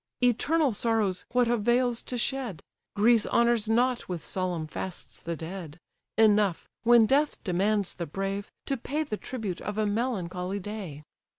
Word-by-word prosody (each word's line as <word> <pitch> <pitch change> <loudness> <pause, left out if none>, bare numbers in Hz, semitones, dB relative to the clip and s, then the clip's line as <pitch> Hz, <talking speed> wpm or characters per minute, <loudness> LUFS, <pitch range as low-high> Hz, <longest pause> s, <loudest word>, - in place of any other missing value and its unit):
Eternal 275 +4 +3
sorrows 210 -4 0
what 245 -1 +3
avails 240 +1 +2
to 250 - -4
shed? 240 - -2 0.3
Greece 225 +1 +4
honours 235 -2 +3
not 245 +1 +1
with 175 -3 -4
solemn 180 -4 -2
fasts 175 +3 -6
the 170 0 -4
dead: 165 -1 -7 0.4
Enough, 210 -4 +3
when 235 -1 +6
death 290 +6 +2
demands 200 +2 +1
the 170 -2 -5
brave, 195 +4 -3
to 275 - -1
pay 290 +6 -2
The 220 -8 -4
tribute 215 -9 -5
of 210 0 -4
a 215 - +2
melancholy 200 -4 -2
day. 190 -7 -7
215 Hz, 150 wpm, -28 LUFS, 185-240 Hz, 0.4 s, when